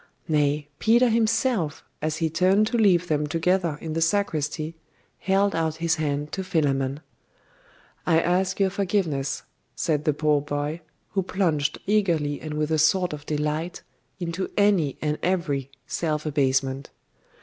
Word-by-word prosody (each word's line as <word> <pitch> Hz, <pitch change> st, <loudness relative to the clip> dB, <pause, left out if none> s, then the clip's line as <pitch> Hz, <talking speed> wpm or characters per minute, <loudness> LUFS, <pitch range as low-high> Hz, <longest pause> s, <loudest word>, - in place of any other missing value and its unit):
Nay, 150 Hz, -1 st, +1 dB
Peter 235 Hz, +2 st, +4 dB
himself, 225 Hz, -, +1 dB, 0.2 s
as 155 Hz, +1 st, -1 dB
he 165 Hz, -, +1 dB
turned 185 Hz, +6 st, +3 dB
to 230 Hz, -, -2 dB
leave 180 Hz, -5 st, +4 dB
them 150 Hz, -2 st, 0 dB
together 165 Hz, 0 st, +1 dB
in 160 Hz, -1 st, -4 dB
the 165 Hz, -, -1 dB
sacristy, 160 Hz, -4 st, 0 dB, 0.4 s
held 195 Hz, +1 st, +2 dB
out 160 Hz, -1 st, 0 dB
his 165 Hz, +1 st, 0 dB
hand 150 Hz, -1 st, -2 dB
to 190 Hz, -, -3 dB
Philammon. 140 Hz, -5 st, 0 dB, 1.1 s
'I 165 Hz, -2 st, +5 dB
ask 185 Hz, +3 st, +1 dB
your 195 Hz, -1 st, +3 dB
forgiveness,' 180 Hz, -9 st, -1 dB, 0.3 s
said 155 Hz, -3 st, 0 dB
the 150 Hz, -, +3 dB
poor 150 Hz, 0 st, +2 dB
boy, 145 Hz, +3 st, -3 dB, 0.3 s
who 195 Hz, -, +1 dB
plunged 170 Hz, -6 st, 0 dB
eagerly 170 Hz, -8 st, +1 dB
and 155 Hz, -1 st, -5 dB
with 150 Hz, +1 st, -1 dB
a 155 Hz, -, +2 dB
sort 180 Hz, +2 st, +3 dB
of 145 Hz, 0 st, -8 dB
delight 150 Hz, +3 st, -2 dB, 0.4 s
into 175 Hz, +1 st, -3 dB
any 195 Hz, -9 st, +3 dB
and 150 Hz, 0 st, -1 dB
every 160 Hz, -8 st, -1 dB, 0.2 s
self 155 Hz, 0 st, -2 dB
abasement. 135 Hz, -2 st, 0 dB
160 Hz, 145 wpm, -25 LUFS, 150-185 Hz, 1.1 s, I